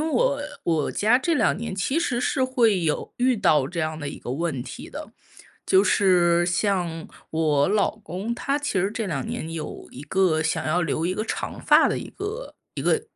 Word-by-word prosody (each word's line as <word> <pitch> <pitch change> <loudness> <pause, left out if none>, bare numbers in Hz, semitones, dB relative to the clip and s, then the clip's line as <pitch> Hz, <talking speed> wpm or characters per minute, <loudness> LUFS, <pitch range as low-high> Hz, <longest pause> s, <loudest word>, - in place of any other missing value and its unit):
我 280 +1 +2 0.2
我 160 -3 +1
家 220 +4 +3
这 325 +6 0
2 - - +2
年 230 -2 -5
其 265 - 0
实 245 -8 0
是 265 0 0
会 235 -7 +3
有 155 -2 -1
遇 250 -1 +3
到 150 -8 +3
这 175 - -6
样 155 -1 -1
的 145 - -4
一 - - -7
个 125 - -5
问 150 -2 -2
题 - - -8
的。 - - -8 0.5
就 190 - +5
是 175 -4 +3
像 175 -3 -1 0.2
我 155 -2 +2
老 210 +1 +1
公， 205 +3 -5
他 280 +4 -1
其 285 -9 -1
实 195 +3 +1
这 225 -1 -3
2 140 -7 -3
年 160 - -4
有 165 -2 -6
一 135 - -10
个 160 0 +2
想 160 0 -1
要 175 +3 +1
留 165 +1 -1
一 185 - -1
个 215 - -2
长 - - -4
发 - - +5
的 - - -1
一 - - -8
个 425 +5 -6 0.2
一 - - -4
个 455 - +2
185 Hz, 210 characters per minute, -24 LUFS, 160-230 Hz, 0.5 s, 就